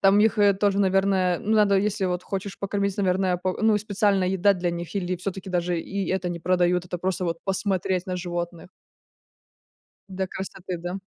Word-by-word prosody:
Там 195 +1 +5
их, 215 0 +3
э, 205 -1 +6
тоже, 200 0 +1
наверное, 190 -2 +2
ну, 215 - 0
надо, 205 -2 +4
если 205 0 0
вот 180 0 -2
хочешь 195 0 -5
покормить, 200 0 -1
наверное, 185 -2 +1
по 185 +1 -1
ну, 220 -1 +5
и - - +1
специальная 200 -2 +1
еда 190 +2 +3
для 175 -2 -1
них 170 +2 -6
или 185 -2 -1
всё-таки 190 +1 -5
даже 175 -1 0
и 195 +3 -4
это 185 -1 -1
не 170 -1 -5
продают, 180 0 +2
это 180 0 -5
просто 185 +1 -1
вот 165 -1 -2
посмотреть 190 -1 -1
на 185 - -2
животных. 175 -1 -5 1.4
Для 190 0 -3
красоты. 185 -1 -6
Да? 175 +3 -5
190 Hz, 190 wpm, -25 LUFS, 180-200 Hz, 1.4 s, э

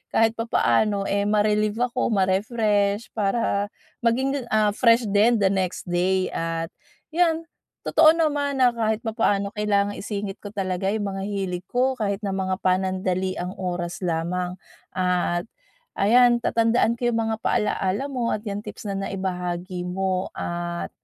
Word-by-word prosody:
kahit 225 0 +4
papaano 210 - +1
eh 200 0 +1
ma-relieve 210 0 +2 0.2
ako, 255 - 0
ma-refresh 205 +1 +1
para 205 -1 0 0.3
maging, 255 +2 0
ah, 215 -1 +2
fresh 230 +2 +4
din 215 +1 +4
the 190 - +4
next 185 -2 -1
day, 185 +1 +1
at 165 0 -3 0.4
yan. 330 -1 +2 0.4
Totoo 315 0 +6
naman 290 -3 0
na 245 - +6
kahit 220 -1 -1
papaano 205 -3 +1
kailangang 205 -1 0
isingit 200 -1 -4
ko 205 - -7
talaga 190 -1 -1
yung 210 0 -1
mga 195 0 -5
hilig 190 -3 -3
ko 255 +2 +2
kahit 200 -2 0
na 195 - -1
mga 190 -1 -1
panandaliang 185 -1 0
oras 175 -1 -3
lamang, 180 +1 -2 0.4
at 180 -1 +1 0.5
ayan, 240 +3 +5
tatandaan 230 0 +2
ko 240 - 0
yung 230 - +1
mga 220 - -1
paalala 210 +5 0
mo 245 -3 -1
at 210 - -2
yang 205 -2 -3
tips - - -8
na 195 - -2
naibahagi 180 -2 -3
mo. 185 0 -1
At 175 0 -4
200 Hz, 145 wpm, -24 LUFS, 185-230 Hz, 0.5 s, Totoo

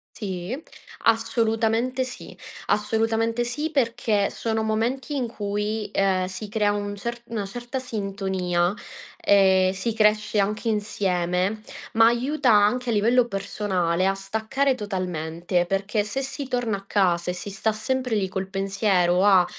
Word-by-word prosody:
Sì. 195 -1 -4 0.5
Assolutamente 225 +2 +1
sì. 255 - -9 0.3
Assolutamente 225 +2 +1
sì, 295 +6 -2
perché 230 -7 +1
sono 220 -1 -2
momenti 235 +7 -1
in 255 -4 -1
cui, 210 0 -3
ehm, 190 -2 +2
si 190 +3 -6
crea 210 -1 +2
un 205 0 -3
cert 235 +4 -5
una 220 -3 -3
certa 240 +6 -5
sintonia 190 -6 -1 0.5
e 190 -2 +5
si 225 +4 -2
cresce 210 -1 +2
anche 210 +3 0
insieme, 195 -1 0 0.3
ma 225 0 +6
aiuta 255 +3 +2
anche 220 +4 +3
a - - +2
livello 235 +4 +4
personale, 190 -4 -1
a 195 - +1
staccare 220 +8 0
totalmente 175 -4 -2
perché 195 +3 0
se 210 +6 -3
si 275 +1 -5
torna 245 -5 -1
a 195 - -13
casa 180 -3 +2
e - - 0
si 185 +3 -6
sta 200 +3 0
sempre 250 +2 -1
lì 200 -3 +1
col 190 0 -4
pensiero, 195 -2 +2
a 190 -3 +6
210 Hz, 140 wpm, -24 LUFS, 195-230 Hz, 0.5 s, ma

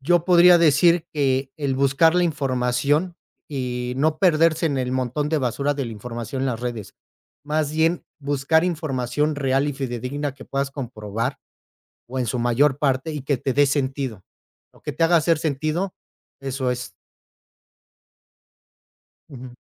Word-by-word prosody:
Yo 170 +4 +2
podría 180 -1 +7
decir 170 +1 +4
que 135 -2 0
el 140 -2 -1
buscar 140 +5 +3
la 180 - +3
información, 140 +3 0 0.3
y 125 -3 -3
no 155 +2 +2
perderse 165 -2 +3
en 140 -3 -1
el 125 0 -2
montón 130 +3 -1
de 160 - +1
basura 140 +3 -1
de 140 -2 -3
la 115 - -6
información 120 +3 -6
en - - +1
las 120 -2 -2
redes. 120 -5 -5 0.5
Más 150 0 0
bien, 160 +2 +1
buscar 145 +3 +1
información 150 -3 -1
real 135 +1 +1
y 145 - -3
fidedigna 135 +2 -3
que 135 - -13
puedas 140 0 -2
comprobar, 120 -1 -4 0.7
o 130 +2 -5
en 125 - -1
su 125 +3 -2
mayor 125 +4 +2
parte, 135 +1 0
y 145 -3 -5
que 140 -1 0
te 130 +1 -2
dé 145 - +5
sentido, 135 -6 -2 0.5
o - - -23
que - - -4
te - - -2
haga 170 +1 +4
hacer 165 0 +2
sentido. 155 +5 -2 0.5
Eso 135 -2 -2
es. 125 -5 -5 2.3
Ujú. 130 -4 -9
140 Hz, 155 wpm, -23 LUFS, 125-155 Hz, 2.3 s, podría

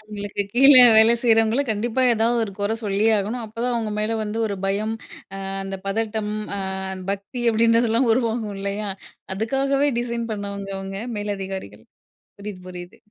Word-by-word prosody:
அவங்களுக்கு 205 -1 -5
கீழ 270 +4 +7 0.2
வேலை 225 +2 +6
செய்யறவங்கள, 225 +2 +3
கண்டிப்பா 230 +4 -1
ஏதாவது 230 +2 +1
ஒரு 200 - -8
கொறை 205 +2 0
சொல்லியே 210 +2 +2
ஆகணும். 225 +4 -3
அப்போதான் 230 +3 -3
அவங்க 220 -2 -2
மேலே 220 +2 -1
வந்து 215 +1 -4
ஒரு 200 - -3
பயம், 210 +3 -1 0.5
அ - - -5 0.2
அந்த 195 0 -5
பதட்டம், 215 0 -2 0.2
அ - - -3 0.5
பக்தி 200 +6 -5
அப்படின்றதெல்லாம் 230 +2 +3
உருவாகும். 225 -3 -1
இல்லையா? 200 +1 -3 0.5
அதுக்காகவே 275 +6 +1
டிசைன் 235 -1 -3
பண்ணவங்க 200 -1 -5
அவங்க 195 0 -6 0.2
மேலதிகாரிகள். 195 - -5 0.5
புரியுது 200 -2 -8
புரியுது. 175 -1 -9
215 Hz, 140 wpm, -22 LUFS, 200-230 Hz, 0.5 s, கீழ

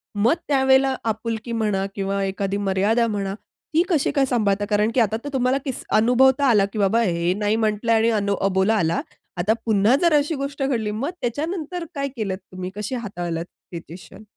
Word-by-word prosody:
मग 220 +7 +3
त्यावेळेला 265 -1 +3
आपुलकी 225 +1 -3
म्हणा 210 -4 0
किंवा 195 0 -1
एखादी 195 0 -2
मर्यादा 205 +4 +1
म्हणा, 200 -3 -2 0.4
ती 325 +2 +4
कशी 315 -6 +2
काय 275 -1 +2
सांभाळता? 205 -5 +1
कारण 210 +1 +2
की 255 - +3
आता 220 -1 +2
तर 290 - -4
तुम्हाला 255 0 +2
किस 265 - -4
अनुभवता 260 +5 +4
आला 205 -4 +4
की 215 - -3
बाबा 205 +4 +3
हे 175 -4 +1
नाही 210 +1 +1
म्हटलं 220 +1 0
आणि 225 +1 +3
अ, 220 - +1 0.3
अबोला 195 +3 +2
आला 170 -4 +1 0.4
आता 200 +5 +2
पुन्हा 215 +2 +4
जर 340 -2 +4
अशी 295 +2 +2
गोष्ट 275 0 -4
घडली 230 -6 0
मग 240 +9 -2
त्याच्यानंतर 325 +7 -3
काय 280 -1 -1
केलत 195 -5 -2
तुम्ही 185 0 -5
कशी 210 +5 -4
हाताळलात 175 -7 -4 0.3
सिच्युएशन? 170 +5 -10
220 Hz, 180 wpm, -22 LUFS, 200-265 Hz, 0.4 s, ती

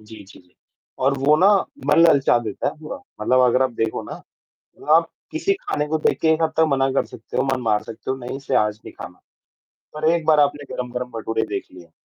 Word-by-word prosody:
जी, 110 +1 -13
जी, 95 - -16
जी। 90 -1 -30 0.4
और 135 +2 +1
वो 145 +3 +4
ना 190 +5 +5 0.4
मन 150 +2 +4
ललचा 135 -5 +4
देता 110 -3 -3
है - - -5
पूरा, 155 - -7 0.2
मतलब 130 +4 +3
अगर 125 +2 +3
आप 130 - +1
देखो 115 -1 -2
ना - - -5 0.8
आप 165 0 +3 0.2
किसी 330 +5 0
खाने 150 0 -2
को 160 - 0
देख 155 - 0
के - - +2
एक 160 - -2
हद 160 - +1
तक 160 - +5
मना 135 -1 +2
कर - - +1
सकते 110 - -9
हो, - - +2
मन 130 - -3
मार 105 -3 +1
सकते 115 +4 -6
हो, - - -2
नहीं 125 +1 -6
इसे 135 -1 -3
आज 105 0 +1
नहीं - - -10
खाना, - - -11 0.8
पर 155 +1 0
एक 170 -1 0
बार 155 -2 +5
आपने 145 -1 0
गरम-गरम 125 0 -4
भटूरे 110 0 -2
देख 100 - -3
लिये 85 -3 -14
130 Hz, 230 wpm, -21 LUFS, 110-150 Hz, 0.8 s, ना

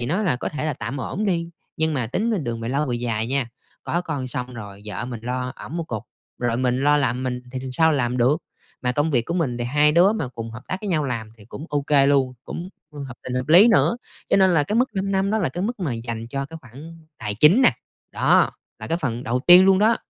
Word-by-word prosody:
thì 120 - -3
nó 180 +9 0
là 170 -11 +1
có - - -3
thể 150 - -4
là 150 - -1
tạm 120 +6 -5
ổn 200 +10 -3
đi, 170 -3 -1 0.3
nhưng 160 0 0
mà 125 -5 -1
tính 200 - -1
đường 115 -2 -3
mà 115 - -4
lâu 140 +3 0
về 120 -2 -1
dài 115 -2 -2
nha, 135 -1 -1 0.3
có 175 - -1
con 145 -7 -4
xong 125 0 -3
rồi 100 -3 -9
vợ 105 +3 -4
mình 120 -2 -6
lo 125 +1 -3
ẵm 160 - -7
một 170 - -2
cục, 110 -8 -5 0.4
rồi 120 -1 0
mình 125 0 0
lo 145 0 +5
làm 130 -3 0
mình 125 -1 -3
thì 130 - -3
th - - -8
sao 160 +4 +4
làm 125 -4 0
được. 130 +4 +3 0.5
Mà 125 0 +1
công 145 +5 0
việc 120 -5 +1
của 170 - -2
mình 135 -9 -1
thì 120 - -2
hai 150 +4 +3
đứa 180 +6 +5
mà 185 - -3
cùng 115 -2 -7
hợp 115 +2 -9
tác 185 - -2
với 210 - -5
nhau 155 -5 +1
làm 115 -5 -4
thì 105 - -15
cũng 140 +8 -9
ô 145 - 0
kê 140 -1 +3
luôn, 135 -3 +2
cũng 175 +2 -6 0.4
hợp 130 - -10
tình 125 - -4
hợp 130 +2 -2
lý 185 +9 +8
nữa. 235 +1 +3 0.3
Cho - - +5
nên 190 -2 +4
là 150 - +4
cái 210 +9 -1
mức 250 +2 +3
5 195 0 -1
năm 195 +1 +1
đó 220 - +1
là 185 - 0
cái 175 +8 -4
mức 230 +1 -3
mà 150 -9 -1
dành 115 0 -5
cho 135 +2 -3
cái 165 - -9
khoản 155 +6 -13
tài 105 0 -4
chính 155 - +5
nè, - - +6 0.4
đó, - - +3 0.3
là - - -7
cái 165 - -1
phần 120 -7 -3
đầu 125 +3 0
tiên 180 +5 +8
luôn 190 -1 +5
đó. 220 +3 +4
140 Hz, 270 wpm, -23 LUFS, 120-170 Hz, 0.5 s, lý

